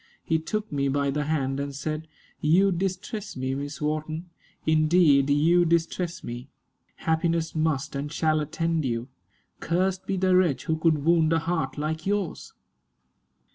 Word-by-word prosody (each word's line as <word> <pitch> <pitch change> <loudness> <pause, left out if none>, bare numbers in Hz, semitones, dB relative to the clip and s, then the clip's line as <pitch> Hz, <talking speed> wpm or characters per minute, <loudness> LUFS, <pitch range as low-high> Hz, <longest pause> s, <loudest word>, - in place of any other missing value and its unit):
He 160 -1 +1
took 215 +6 -3
me 140 -1 0
by 140 0 +1
the 150 +1 -1
hand, 140 -3 -1
and 140 0 -4
said, 155 +3 -4 0.3
"You 185 +6 +4
distress 195 - -3
me, 130 +1 -2
Miss 140 +2 -5
Wharton; 155 +3 -3 0.3
indeed 155 -3 +4
you 165 +5 +4
distress 170 +1 0
me. 120 +3 -7 0.5
Happiness 165 0 0
must 155 -2 -1
and 145 +1 -3
shall 155 -1 +1
attend 165 +2 -1
you. 120 0 -2 0.5
Cursed 185 +2 0
be 195 - 0
the 185 0 +3
wretch 160 -9 +2
who 160 - 0
could 155 -3 +1
wound 165 -1 +4
a - - +4
heart 165 0 -2
like 160 +3 -3
yours." 200 -4 -2
160 Hz, 150 wpm, -26 LUFS, 145-170 Hz, 0.5 s, You